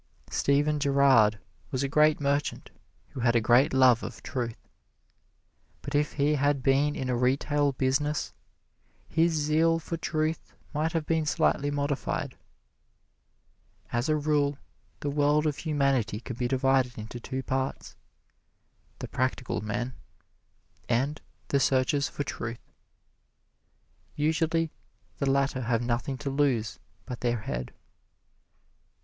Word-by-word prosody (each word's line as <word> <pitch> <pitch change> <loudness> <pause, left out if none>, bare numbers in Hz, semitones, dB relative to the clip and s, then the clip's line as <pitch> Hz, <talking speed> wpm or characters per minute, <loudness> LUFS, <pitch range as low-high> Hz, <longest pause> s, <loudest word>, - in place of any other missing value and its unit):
Stephen 145 +2 +2
Girard 135 -7 +4 0.3
was 130 0 -1
a - - +1
great 150 +2 +4
merchant 140 0 -1 0.4
who - - -8
had 120 0 +2
a - - +6
great 120 +5 +4
love 130 -3 +5
of - - -8
truth; 120 -4 -4 1.2
but 140 - -6
if 145 0 +1
he 145 +1 +2
had 145 -2 +1
been 140 +3 +3
in 130 - -3
a 125 - 0
retail 140 +3 +1
business, 140 +3 0 0.7
his 165 +1 +2
zeal 160 +2 +2
for 165 +1 -5
truth 155 0 -2 0.2
might 155 +3 0
have 165 -2 -1
been 160 0 +1
slightly 145 -1 +1
modified. 145 -1 -2 1.6
As 120 +4 -1
a 155 - +3
rule, 145 -1 +1 0.4
the 145 - -1
world 145 +1 +2
of 150 -2 0
humanity 140 -9 0
can 120 +1 -7
be 120 0 -1
divided 130 -1 +1
into 110 +2 -7
two 130 +2 -5
parts: 130 +1 -3 1.0
the - - -6
practical 130 -1 -2
men 115 +4 -3 1.0
and 135 +6 0 0.3
the 140 - +2
searchers 135 +2 +2
for 145 - -3
truth. 115 -3 -6 1.4
Usually 160 +1 +1 0.5
the 140 - +1
latter 135 -1 +1
have 120 0 0
nothing 120 +3 -1
to 140 - 0
lose 135 -5 0 0.3
but 125 - -6
their 120 -2 0
head. 60 -9 -4
140 Hz, 130 wpm, -28 LUFS, 125-150 Hz, 1.6 s, a